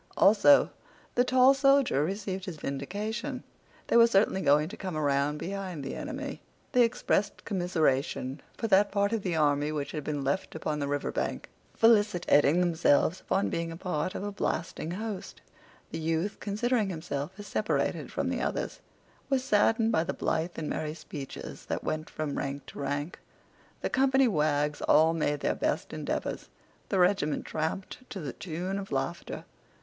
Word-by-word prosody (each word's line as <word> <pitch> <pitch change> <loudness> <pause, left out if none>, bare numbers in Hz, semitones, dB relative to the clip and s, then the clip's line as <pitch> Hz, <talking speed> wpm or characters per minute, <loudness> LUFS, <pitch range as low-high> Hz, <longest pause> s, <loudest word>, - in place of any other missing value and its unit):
Also, 225 +8 +6 0.4
the 245 - +4
tall 255 +1 +6
soldier 275 - +4
received 190 +1 -3
his 175 -4 -6
vindication. 215 - -4 0.4
They - - +3
were 230 0 +8
certainly 195 -3 +3
going 150 0 +4
to 215 - -8
come 185 -6 -5
around 140 -1 +1
in - - -6
behind 185 -4 -5
the 135 - -4
enemy. 285 -2 -5 0.3
They 250 - +4
expressed 230 -3 +1
commiseration 155 - 0 0.2
for - - -3
that 200 -1 +4
part 200 +1 +1
of 225 - 0
the 180 -3 -1
army 145 -1 +2
which 145 -2 -3
had 150 -2 -4
been 145 -1 -2
left 140 +7 -1
upon 155 -1 -2
the 140 - -1
river 145 0 -1
bank, - - -3 0.3
felicitating 180 -8 +4
themselves 170 0 +3
upon 195 - 0
being 165 0 -2
a 165 - -7
part 180 -1 -2
of - - -4
a 205 - -3
blasting 165 -4 -2
host. 205 +2 -5 0.5
The - - -4
youth, 165 +5 -1
considering 215 +1 0
himself 160 -2 -4
as 205 - -8
separated 210 +2 -1
from - - -1
the - - -2
others, - - -2 0.5
was 265 -2 +2
saddened 225 -1 +3
by 190 -8 +2
the 180 - -3
blithe 165 +2 -1
and 155 - -3
merry 155 0 -3
speeches 140 -4 -8
that - - -2
went 155 0 -3
from 155 -2 -3
rank 140 +1 -4
to - - -10
rank. 145 +4 -3 0.6
The - - -1
company 265 0 +4
wags 150 -5 +1
all 160 +2 +5
made 150 -3 0
their - - +1
best - - -2
endeavors. - - -3 0.4
The 195 - +1
regiment 180 -5 +2
tramped 160 +4 -3
to 195 - -6
the 145 -6 -5
tune 185 +3 -4
of 195 - -8
laughter. 140 +6 -3
175 Hz, 170 wpm, -29 LUFS, 150-210 Hz, 0.6 s, were